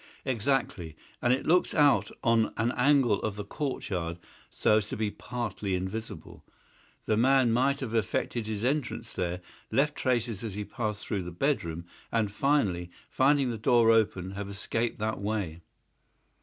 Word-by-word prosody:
"Exactly. 115 - -1 0.3
And 120 - +3
it 130 - +1
looks 180 +2 +3
out 145 -2 +4
on 115 -1 +3
an 115 +2 +1
angle 130 -5 +3
of 105 -2 -2
the 105 -1 -5
courtyard 95 - -3 0.3
so 105 - +3
as 105 -1 -1
to - - -5
be 105 -1 -1
partly 110 -6 -3
invisible. 95 +5 -6 0.6
The 110 - +1
man 130 0 +4
might 135 +4 +2
have 120 -4 -4
effected 115 +1 -1
his 110 -1 -3
entrance 125 -3 -1
there, 90 0 -2 0.3
left 140 +6 +2
traces 120 -4 -1
as 110 -4 -4
he 105 0 -4
passed 105 -3 -4
through 100 -3 -2
the 90 0 -6
bedroom, 85 - -1 0.3
and, 110 -3 +1
finally, 105 -9 +1 0.2
finding 135 -1 +3
the 115 - -5
door 115 0 +5
open 100 -5 +2
have 100 0 -5
escaped 115 +4 -2
that 110 +1 -2
way." 100 -6 -3
110 Hz, 155 wpm, -29 LUFS, 100-130 Hz, 0.6 s, door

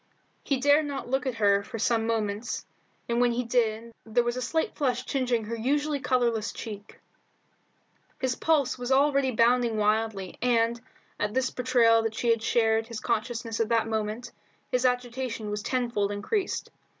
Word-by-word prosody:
He 275 - 0
dared 290 +3 +4
not 275 -3 -5
look 265 0 0
at 255 - -2
her 200 -2 +3
for 225 - -7
some 225 0 +1
moments, 220 0 -2 0.4
and 235 +1 +1
when 245 -1 +3
he 245 +1 -1
did 230 -1 0
there 230 +2 +1
was 240 0 -1
a 255 - -3
slight 320 +6 -1
flush 255 -3 -1
tingeing 250 -5 0
her 230 +2 -4
usually 285 +5 0
colourless 240 -4 0
cheek. 205 -3 -9 1.2
His 255 -1 0
pulses 285 -6 +1
were 265 - +5
already 275 -1 +3
bounding 235 -1 +3
wildly, 210 -2 0
and, 235 -1 +2 0.4
at 210 +2 -1
this 260 0 +1
betrayal 240 -2 +3
that 225 -1 -3
she 235 +1 +1
had 230 -1 +1
shared 225 -1 +2
his 230 -2 -6
consciousness 230 0 -2
at 225 -1 +1
that 230 -1 +2
moment, 220 +2 -3 0.4
his 250 0 +3
agitation 245 -3 -3
was 210 0 -2
tenfold 235 -5 -1
increased. 370 - -2
235 Hz, 165 wpm, -27 LUFS, 225-255 Hz, 1.2 s, were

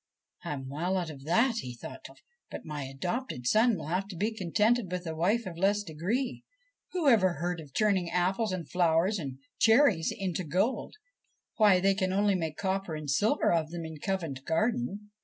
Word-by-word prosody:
' - - -35
I - - -3
am 135 -2 -6
well 170 +8 -1
out 175 -3 -2
of 135 -2 -12
that,' 230 - +3
he 125 - -5
thought - - -9
to - - -9
himself; - - -25
' - - -57
but - - -8
my 150 -3 -4
adopted 135 - -4
son 220 - +4
will 160 - -7
have 180 +5 -1
to 195 - -8
be 210 +6 -1
contented 210 +2 +1
with 180 0 -3
a 160 - -3
wife 200 +9 +1
of 170 -3 -7
less 205 +2 +2
degree. 205 - -2 0.5
Who 350 -5 0
ever 195 -8 +5
heard 175 +2 -3
of 150 -3 -11
turning 195 -1 +1
apples 185 +5 +1
and 175 -5 -4
flowers 175 +3 +2
and 135 -5 -5 0.2
cherries 225 - +4
into 185 -3 -3
gold? 185 - -1 0.6
Why, 205 -4 +6
they 195 +1 +3
can 190 -1 -1
only 200 +1 +2
make 160 -4 -2
copper 190 -3 -2
and 150 -2 -4
silver 215 - +2
of 160 -2 +1
them 170 0 -5
in 160 -1 -8
Covent 165 -8 -3
Garden.' 210 - -1
185 Hz, 205 wpm, -29 LUFS, 160-210 Hz, 0.6 s, Why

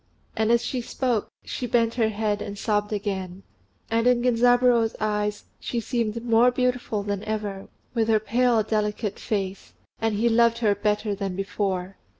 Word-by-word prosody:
And 220 +1 +1
as 235 0 +3
she 255 - -2
spoke, 240 -2 -1 0.2
she 245 - -4
bent 230 -1 +2
her 225 -3 +1
head 210 -1 -1
and 205 - -6
sobbed 210 0 0
again; 195 -3 -3 0.5
and 230 +1 +2
in 245 -1 +3
Genzaburô's 245 -1 +4
eyes 210 -1 -1 0.2
she 240 - -3
seemed 230 -1 -2
more 230 +1 +5
beautiful 250 -4 -1
than 200 0 -3
ever, 210 -3 -4 0.3
with 225 -2 +1
her 220 -1 +4
pale, 235 +1 +2
delicate 210 -1 -2
face; 195 -2 -3 0.3
and 225 -1 0
he 225 +3 +2
loved 235 0 +4
her 220 -3 +2
better 210 +1 0
than 195 -2 -3
before. 195 -1 -2
220 Hz, 160 wpm, -25 LUFS, 205-235 Hz, 0.5 s, more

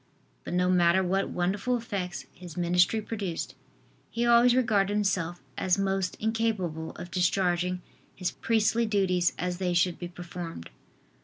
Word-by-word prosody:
But - - -4
no 180 0 +2
matter 180 0 +4
what 195 +2 0
wonderful 200 +8 0
effects 200 -6 -4
his 175 -2 -11
ministry 180 +5 +2
produced, 200 -7 -4 0.6
he 235 +1 -1
always 240 +1 +6
regarded 210 -6 +2
himself 185 -6 -1 0.2
as 185 0 +2
most 195 -1 0
incapable 215 -8 -1
of 175 - -8
discharging 180 0 +1 0.3
his 180 -1 -2
priestly 230 +1 +1
duties 185 -4 +2
as 180 0 -2
they 180 -2 0
should 175 0 +2
be 175 - -4
performed. 175 - -8
185 Hz, 140 wpm, -28 LUFS, 175-210 Hz, 0.6 s, always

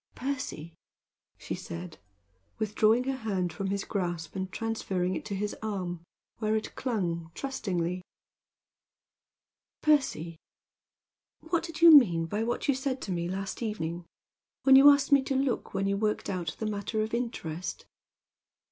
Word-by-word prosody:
"Percy!" 255 - -4 0.6
she - - -5
said, 170 -1 -7 0.6
withdrawing 220 +2 +3
her 265 0 -2
hand 195 -7 -2
from 195 - -3
his 200 0 -1
grasp 175 -5 -3
and 190 -1 -3
transferring 190 -5 -2
it - - -4
to 205 -2 -3
his 205 +2 -2
arm, 185 -5 -3 0.4
where 215 -1 +1
it 215 - -3
clung 175 -10 -2
trustingly. 185 -10 -2 1.8
"Percy! 265 - +2 1.0
what 330 +1 0
did 330 -1 -7
you 335 - +11
mean 175 - +6
by 205 +6 -2
what 240 +5 -2
you 280 - +4
said 265 0 -2
to 195 - -4
me 170 -1 -2
last 195 +3 -4
evening 175 -6 -3 0.6
when 265 -1 +7
you 275 +2 +10
asked 280 -1 +4
me 280 -1 +7
to 270 +1 -2
look 265 -2 -1
when 195 - 0
you 200 0 +1
worked 210 -1 -1
out 175 -4 -3
that 220 - -3
matter 215 +1 -1
of 220 - -5
interest?" 185 -9 -4
210 Hz, 145 wpm, -29 LUFS, 180-255 Hz, 1.8 s, you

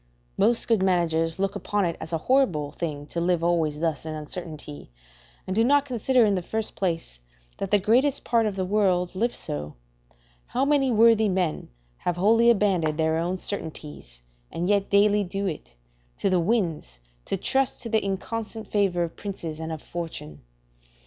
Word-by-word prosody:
Most 235 0 +2
good 225 -4 +3
managers 165 -3 +1
look 195 +1 -1
upon 205 -2 -1
it 170 - -1
as 160 - -7
a 165 - +1
horrible 165 - +1
thing 150 -4 -4
to 170 +3 -4
live 175 -1 +1
always 165 -3 +1
thus 160 -4 -1
in 155 -1 -5
uncertainty, 155 - -6 0.6
and 185 - -3
do 225 - +4
not 285 +3 +4
consider, 250 -1 +2
in 205 - +2
the 185 - 0
first 220 +5 -3
place, 165 - -3 0.4
that 195 - -3
the 205 - +5
greatest 245 +8 +2
part 230 -2 +2
of 205 - -3
the 190 -1 -1
world 185 -3 +1
live 235 +6 -1
so: 75 0 -5 0.7
how 260 +3 0
many 280 -2 +3
worthy 225 -2 +5
men 180 -4 -1 0.3
have 175 -1 -2
wholly 225 +5 +4
abandoned 185 -9 +2
their 160 0 +1
own 175 +3 -1
certainties, 150 - -6 0.3
and 175 +2 -2
yet 200 -1 +2
daily 205 +1 +4
do 195 +2 -3
it, 160 - -5 0.4
to 195 - 0
the 185 - +3
winds, 170 - -1 0.3
to - - -1
trust 265 +7 0
to 230 - -5
the 220 -1 +2
inconstant 215 +2 -4
favour 195 -4 +1
of 165 - -5
princes 170 -6 -6
and 160 0 -5
of 160 -2 -6
fortune? 155 - -7
185 Hz, 175 wpm, -25 LUFS, 165-215 Hz, 0.7 s, the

